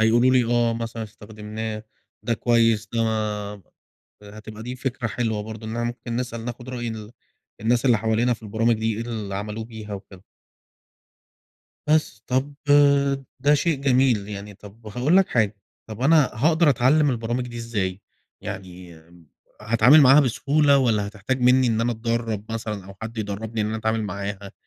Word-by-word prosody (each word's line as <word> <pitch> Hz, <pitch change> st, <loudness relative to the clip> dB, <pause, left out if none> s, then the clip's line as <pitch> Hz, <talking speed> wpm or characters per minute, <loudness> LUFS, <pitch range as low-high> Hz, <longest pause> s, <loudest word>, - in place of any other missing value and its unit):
هيقولوا 120 Hz, +3 st, +4 dB
لي 125 Hz, -2 st, +4 dB
آه، 120 Hz, 0 st, +2 dB
مثلًا 115 Hz, 0 st, -5 dB
استخدمناه 110 Hz, +1 st, -7 dB, 0.4 s
ده 115 Hz, -, 0 dB
كويس 115 Hz, -3 st, +2 dB
ده 115 Hz, -1 st, +1 dB
ما 115 Hz, -, +1 dB, 1.2 s
آآ 105 Hz, +1 st, -12 dB
هتبقى 110 Hz, 0 st, -10 dB
دي 125 Hz, +1 st, -5 dB
فكرة 125 Hz, -2 st, -3 dB
حلوة 110 Hz, -2 st, -2 dB
برضه 110 Hz, +1 st, -8 dB
إنّنا 120 Hz, +1 st, -3 dB
ممكن 120 Hz, 0 st, -4 dB
نسأل 120 Hz, -2 st, -4 dB
ناخُد 120 Hz, +1 st, -7 dB
رأي 120 Hz, -2 st, -4 dB
ال 110 Hz, -1 st, -7 dB, 0.5 s
الناس 120 Hz, +3 st, +1 dB
اللي 120 Hz, -3 st, +5 dB
حوالينا 115 Hz, +3 st, +1 dB
في 115 Hz, -, -11 dB
البرامج 115 Hz, +2 st, +1 dB
دي، 110 Hz, 0 st, -1 dB
إيه 115 Hz, -, -3 dB
اللي 110 Hz, -4 st, -5 dB
عملوه 105 Hz, +2 st, -4 dB
بيها 110 Hz, -2 st, -8 dB
وكده. 95 Hz, -1 st, -11 dB, 1.6 s
بس، 150 Hz, -8 st, +1 dB
طَب 130 Hz, +3 st, -1 dB, 0.9 s
ده 145 Hz, +1 st, +4 dB
شيء 150 Hz, -1 st, 0 dB
جميل، 125 Hz, -6 st, +2 dB
يعني 105 Hz, 0 st, -7 dB
طَب 105 Hz, +3 st, -15 dB
هاقول 125 Hz, -, +1 dB
لك 195 Hz, -, +4 dB
حاجة، 110 Hz, -3 st, +1 dB, 0.3 s
طَب 110 Hz, 0 st, -9 dB
أنا 150 Hz, +1 st, +4 dB
هاقدر 155 Hz, +5 st, +3 dB
أتعلّم 140 Hz, +4 st, +3 dB
البرامج 120 Hz, +1 st, -2 dB
دي 120 Hz, -, -8 dB
إزاي؟ 100 Hz, -5 st, -3 dB, 0.4 s
يعني 90 Hz, -2 st, -8 dB, 0.6 s
هاتعامل 115 Hz, +7 st, +5 dB
معاها 140 Hz, +1 st, +7 dB
بسهولة 140 Hz, +2 st, +3 dB
والّا 110 Hz, -6 st, +1 dB
هتحتاج 110 Hz, +6 st, -3 dB
منّي 125 Hz, +1 st, +4 dB
إن 115 Hz, -1 st, +1 dB
أنا 120 Hz, +1 st, +1 dB
أتدرّب 115 Hz, -2 st, -2 dB
مثلًا 110 Hz, -4 st, -4 dB
أو 100 Hz, 0 st, -11 dB
حد 115 Hz, +1 st, -6 dB
يدرّبني 110 Hz, +2 st, -4 dB
إن 105 Hz, -, 0 dB
أنا 110 Hz, +1 st, -2 dB
أتعامل 110 Hz, 0 st, -1 dB
معاها؟ 100 Hz, 0 st, -5 dB
115 Hz, 165 wpm, -23 LUFS, 105-125 Hz, 1.6 s, معاها